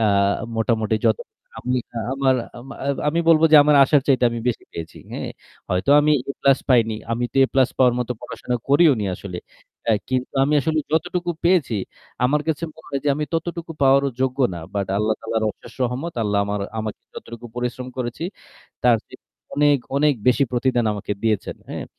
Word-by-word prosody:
আ 110 Hz, -, +2 dB, 0.5 s
মোটামুটি 110 Hz, -1 st, +1 dB
যত -, -, +3 dB, 0.4 s
আমি 125 Hz, 0 st, -1 dB, 0.4 s
আমার 135 Hz, -1 st, +2 dB, 0.2 s
আমা 135 Hz, +3 st, -10 dB, 0.3 s
আমি 165 Hz, +3 st, 0 dB
বলবো 160 Hz, -1 st, +6 dB
যে -, -, +10 dB
আমার 150 Hz, -1 st, +5 dB
আশার 140 Hz, -1 st, +3 dB
চাইতে 130 Hz, -2 st, +4 dB, 0.2 s
বেশি 120 Hz, -, -2 dB
পেয়েছি, 80 Hz, -1 st, -8 dB
হ্যাঁ? -, -, -4 dB, 0.4 s
হয়তো 90 Hz, +9 st, 0 dB
আমি 150 Hz, +1 st, +2 dB, 0.2 s
'এ -, -, -1 dB
প্লাস' 135 Hz, -1 st, +3 dB
পাইনি, 115 Hz, -3 st, +4 dB, 0.2 s
আমিতো 120 Hz, +1 st, -3 dB
'এ -, -, +5 dB
প্লাস' 130 Hz, -1 st, +3 dB
পাওয়ার 125 Hz, -2 st, +5 dB
মতো 125 Hz, 0 st, -1 dB
পড়াশোনা 125 Hz, -, -4 dB
করিওনি 140 Hz, -7 st, +4 dB
আসলে। 90 Hz, -2 st, -7 dB, 0.5 s
অ্যা 115 Hz, -, +2 dB, 0.2 s
কিন্তু 130 Hz, -1 st, -2 dB
আসলে 145 Hz, +2 st, +2 dB
আমি 155 Hz, -, +2 dB
যতটুকু 175 Hz, +2 st, 0 dB
পেয়েছি, 170 Hz, -10 st, +3 dB, 0.5 s
আমার 145 Hz, +4 st, +3 dB
কাছে 155 Hz, 0 st, -1 dB
মনে 160 Hz, -, -17 dB
হয় 140 Hz, -1 st, -2 dB
যে -, -, +2 dB
আমি 150 Hz, +2 st, -2 dB
ততোটুকু 165 Hz, 0 st, -3 dB
পাওয়ারও 135 Hz, +1 st, +5 dB
যোগ্য 130 Hz, +1 st, 0 dB, 0.2 s
না। -, -, -6 dB, 0.2 s
বাট 100 Hz, -1 st, -1 dB
আল্লাহ 110 Hz, +1 st, +1 dB
তাআলার 115 Hz, -1 st, -2 dB
অশেষ -, -, -14 dB
রহমত 135 Hz, +8 st, -3 dB
আল্লাহ 105 Hz, -1 st, +1 dB
আমার 100 Hz, 0 st, -2 dB, 0.2 s
আমাকে 110 Hz, -1 st, -4 dB
যতটুকু 120 Hz, +1 st, -9 dB
পরিশ্রম 125 Hz, +1 st, -3 dB
করেছি, 125 Hz, +4 st, -4 dB, 0.6 s
তারচেয়ে 120 Hz, -3 st, +1 dB, 0.4 s
অনেক, 145 Hz, 0 st, +4 dB, 0.2 s
অনেক 150 Hz, +1 st, +3 dB
বেশি 125 Hz, +2 st, +4 dB
প্রতিদান 125 Hz, -1 st, +1 dB
আমাকে 105 Hz, 0 st, -4 dB
দিয়েছেন, 110 Hz, -3 st, -1 dB
হ্যাঁ? -, -, -5 dB
130 Hz, 170 wpm, -22 LUFS, 115-145 Hz, 0.6 s, যে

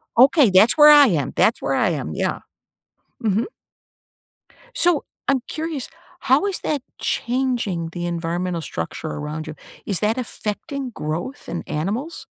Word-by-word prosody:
Okay, 265 Hz, 0 st, +6 dB
that's 190 Hz, +9 st, +5 dB
where 300 Hz, 0 st, +9 dB
I 290 Hz, -2 st, +8 dB
am. 155 Hz, -, -1 dB
That's 225 Hz, -, +3 dB
where -, -, -1 dB
I 240 Hz, -8 st, +2 dB
am, 135 Hz, -, -3 dB
yeah. -, -, -1 dB, 0.8 s
Mhm. 215 Hz, 0 st, +1 dB, 1.3 s
So, 350 Hz, -, +2 dB, 0.2 s
I'm 270 Hz, -2 st, +2 dB
curious, 310 Hz, -4 st, -4 dB, 0.3 s
how 270 Hz, +9 st, +3 dB
is 395 Hz, -3 st, -2 dB
that 290 Hz, -4 st, -2 dB, 0.2 s
changing 235 Hz, -10 st, -1 dB
the 175 Hz, 0 st, -4 dB
environmental 170 Hz, 0 st, -2 dB
structure 105 Hz, -, -5 dB
around 155 Hz, +1 st, -5 dB
you? 155 Hz, -, -7 dB, 0.3 s
Is 195 Hz, -4 st, 0 dB
that 220 Hz, +3 st, 0 dB
affecting 255 Hz, +3 st, -4 dB
growth 175 Hz, -, -5 dB
in 170 Hz, -, -4 dB
animals? 215 Hz, -, -3 dB
220 Hz, 140 wpm, -22 LUFS, 170-270 Hz, 1.3 s, where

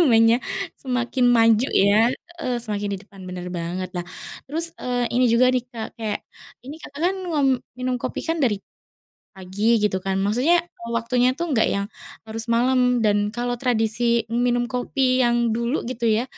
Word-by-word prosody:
namanya? 230 Hz, -7 st, +5 dB, 0.4 s
Semakin 250 Hz, 0 st, -1 dB
maju 230 Hz, +2 st, +4 dB
ya, 205 Hz, +4 st, +4 dB, 0.3 s
heeh, 250 Hz, -5 st, -1 dB
semakin 205 Hz, -2 st, -2 dB
di -, -, -10 dB
depan 195 Hz, -1 st, -16 dB
bener 180 Hz, -1 st, -6 dB
banget. 180 Hz, +2 st, -3 dB
Lah, 175 Hz, -, -2 dB, 0.4 s
terus, 330 Hz, +3 st, -3 dB
eee, 245 Hz, -1 st, -1 dB
ini 255 Hz, -, +4 dB
juga 250 Hz, +2 st, +5 dB
nih 255 Hz, -1 st, +1 dB
Kak, 230 Hz, -3 st, -6 dB
kayak, 215 Hz, -2 st, -2 dB, 0.5 s
ini 280 Hz, +4 st, -8 dB
Kakak 280 Hz, -1 st, -10 dB
kan -, -, -6 dB
wam 295 Hz, -4 st, +1 dB, 0.3 s
minum 255 Hz, 0 st, -1 dB
kopi -, -, -4 dB
kan 325 Hz, 0 st, -1 dB
dari, 235 Hz, -7 st, +2 dB, 0.8 s
pagi 200 Hz, +5 st, +1 dB
gitu 210 Hz, -3 st, 0 dB
kan, 190 Hz, 0 st, -2 dB
maksudnya 250 Hz, -, +2 dB, 0.2 s
waktunya 245 Hz, +2 st, +1 dB
tuh 340 Hz, -1 st, -2 dB
enggak 225 Hz, -4 st, +3 dB
yang 200 Hz, -, 0 dB, 0.4 s
harus 225 Hz, +1 st, -6 dB
malam, 250 Hz, 0 st, +2 dB
dan 205 Hz, -1 st, +2 dB
kalau 240 Hz, +3 st, -3 dB
tradisi 235 Hz, -1 st, +1 dB
minum 245 Hz, 0 st, +2 dB
kopi 255 Hz, +1 st, 0 dB
yang 240 Hz, -2 st, +2 dB
dulu 235 Hz, +5 st, -1 dB
gitu 235 Hz, -1 st, -2 dB
ya, 220 Hz, +3 st, +2 dB
235 Hz, 165 wpm, -23 LUFS, 215-255 Hz, 0.8 s, namanya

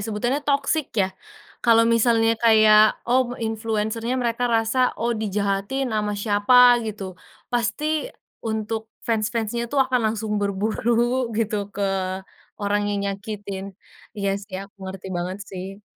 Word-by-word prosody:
sebutannya 225 Hz, +7 st, -1 dB
toksik 285 Hz, +1 st, 0 dB
ya? 190 Hz, -2 st, +1 dB, 0.5 s
Kalau 230 Hz, -1 st, +5 dB
misalnya 230 Hz, 0 st, +3 dB
kayak 215 Hz, -2 st, +6 dB
oh 245 Hz, 0 st, +1 dB
influenser 220 Hz, 0 st, -2 dB
nya 250 Hz, +3 st, -1 dB
mereka 240 Hz, 0 st, 0 dB
rasa 230 Hz, +3 st, +2 dB
oh 235 Hz, +2 st, 0 dB
dijahatin 210 Hz, +4 st, -1 dB
ama 210 Hz, -1 st, 0 dB
siapa 240 Hz, +4 st, +5 dB
gitu, 200 Hz, -4 st, -6 dB, 0.4 s
pasti 305 Hz, -, 0 dB, 0.3 s
untuk 220 Hz, 0 st, -3 dB, 0.2 s
fans-fans-nya 230 Hz, +1 st, -1 dB
tuh 285 Hz, -, 0 dB
akan 255 Hz, -1 st, +1 dB
langsung 220 Hz, -1 st, -3 dB
berburu 230 Hz, +5 st, 0 dB
gitu 220 Hz, -1 st, 0 dB
ke 200 Hz, -, -4 dB, 0.8 s
orang 205 Hz, 0 st, 0 dB
yang 205 Hz, -, -1 dB
nyakitin. 200 Hz, -1 st, -6 dB, 0.5 s
Iya 200 Hz, -1 st, 0 dB
sih 190 Hz, -2 st, -7 dB
aku 200 Hz, 0 st, -15 dB
ngerti 190 Hz, 0 st, -8 dB
banget 180 Hz, +3 st, -3 dB
sih. 195 Hz, +2 st, -8 dB
220 Hz, 130 wpm, -23 LUFS, 205-240 Hz, 0.8 s, kayak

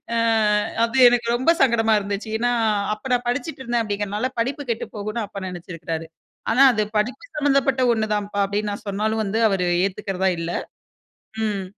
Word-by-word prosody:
அ -, -, +1 dB, 0.7 s
அது 230 Hz, +3 st, -3 dB
எனக்கு 240 Hz, -1 st, 0 dB
ரொம்ப 260 Hz, +7 st, +3 dB
சங்கடமா 225 Hz, -4 st, +3 dB
இருந்துச்சு. 200 Hz, +2 st, -4 dB
ஏன்னா, 245 Hz, +1 st, +1 dB, 0.4 s
அப்ப 215 Hz, -, -22 dB
நான் 245 Hz, 0 st, 0 dB
படிச்சுட்டுருந்தேன் 245 Hz, -3 st, -2 dB
அப்படீங்கிறனால, 205 Hz, +3 st, -2 dB
படிப்பு 265 Hz, +5 st, -1 dB
கெட்டுப்போகுன்னு, 215 Hz, 0 st, -4 dB
அப்பா 195 Hz, -, -8 dB
நெனச்சிருக்குறாரு. 165 Hz, -2 st, -6 dB, 0.4 s
ஆனா, 250 Hz, +4 st, +5 dB
"அது 215 Hz, -2 st, +1 dB
படிப்பு 215 Hz, -, -1 dB
சம்மந்தப்பட்ட 275 Hz, -3 st, +2 dB
ஒண்ணுதாம்ப்பா" 210 Hz, -2 st, -2 dB
அப்படீன்னு 205 Hz, +1 st, -2 dB
நான் 205 Hz, -, -7 dB
சொன்னாலும் 215 Hz, +2 st, -1 dB
வந்து 205 Hz, +3 st, -1 dB
அவரு 185 Hz, -2 st, 0 dB, 0.2 s
ஏத்துக்கிறதா 190 Hz, -1 st, -1 dB
இல்லை. 165 Hz, +1 st, -2 dB, 0.9 s
ம். 200 Hz, -3 st, -2 dB
215 Hz, 140 wpm, -22 LUFS, 200-240 Hz, 0.9 s, ஆனா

